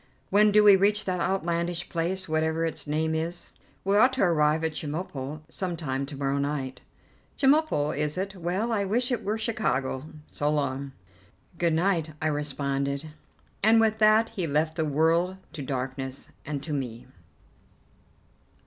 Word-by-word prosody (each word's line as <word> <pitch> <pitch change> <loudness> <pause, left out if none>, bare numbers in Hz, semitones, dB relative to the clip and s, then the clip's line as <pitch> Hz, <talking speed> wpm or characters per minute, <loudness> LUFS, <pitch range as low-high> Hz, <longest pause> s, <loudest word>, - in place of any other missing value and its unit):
When 210 +2 +5
do 210 +1 +6
we 205 -1 +9
reach 205 +2 +2
that 185 -1 -1
outlandish 175 -1 -1
place, 180 +3 -2
whatever 160 +1 0
its 160 -2 -5
name 160 +2 0
is?" 165 +2 -3 0.3
"We 195 +1 +2
ought 255 +4 +5
to 260 - +1
arrive 160 -3 +3
at 160 - +1
Chemulpo 150 -2 -5
some 175 +1 -4
time 135 -3 -2
to 145 -1 -8
morrow 140 0 0
night." 140 -2 -3 0.6
"Chemulpo, 270 - +3
is 150 +3 -2
it? 195 +1 -3
Well, 185 +6 -1
I 210 -3 +1
wish 240 +6 0
it 235 -2 -1
was 215 +2 -2
Chicago. 150 - -1 0.2
So 145 - -2
long." 140 -2 -1 0.7
"Good 170 -2 +2
night," 165 -2 +1
I - - -3
responded, 140 0 -2 0.5
and 220 +2 +6
with 220 -1 +2
that 215 +1 +5
he 190 -7 -3
left 155 +2 0
the 160 -2 0
world 165 +5 +2 0.2
to 150 - -6
darkness 130 0 -4 0.2
and 145 -2 -3
to 155 - -4
me. 125 -5 -4
160 Hz, 160 wpm, -27 LUFS, 145-195 Hz, 0.7 s, we